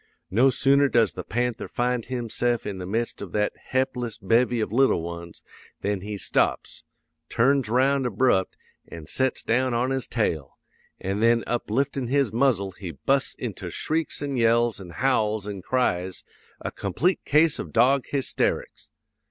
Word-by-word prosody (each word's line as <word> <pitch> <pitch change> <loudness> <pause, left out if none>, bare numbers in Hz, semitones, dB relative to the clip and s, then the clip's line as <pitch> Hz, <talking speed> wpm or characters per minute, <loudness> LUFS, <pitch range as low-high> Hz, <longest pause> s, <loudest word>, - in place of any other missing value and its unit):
No 120 +8 +5
sooner 140 +1 +3
does 115 -5 +3
the - - -6
panther 120 +1 -2
find 125 -1 -1
himse'f 120 -1 -1
in 100 -2 -4
the 90 - -6
midst 115 +4 -2
of 100 -4 -7
that 105 -1 +1 0.2
he'pless 125 -3 -1
bevy 115 +4 +2
of 110 - -2
little 125 -8 +3
ones, 85 0 -8 0.4
than 100 -1 -1
he 105 +1 -5
stops, - - -1 0.5
turns 135 -1 +2
round 130 +2 +2
abrupt, 105 -4 +1 0.3
an' 80 -2 -9
sets 130 +10 0
down 125 +1 +1
on 125 +3 0
his 135 -1 -2
tail; 80 - -2 0.4
an' 95 +2 -2
then 115 +1 +3
upliftin' 125 +3 -1
his 135 -5 +1
muzzle 115 -6 +2
he 90 -1 -8
busts 135 - 0
into 105 -6 -5
shrieks 155 - -2
an' 140 -2 -2
yells 115 -2 +2
an' 90 - -10
howls 110 0 0
an' 100 -2 -5
cries, 95 -7 -1 0.4
a - - -5
complete 180 +3 -1
case 150 +1 +3
of - - -6
dog 130 +3 +3
hysterics! 140 -2 -2
120 Hz, 155 wpm, -25 LUFS, 100-130 Hz, 0.5 s, No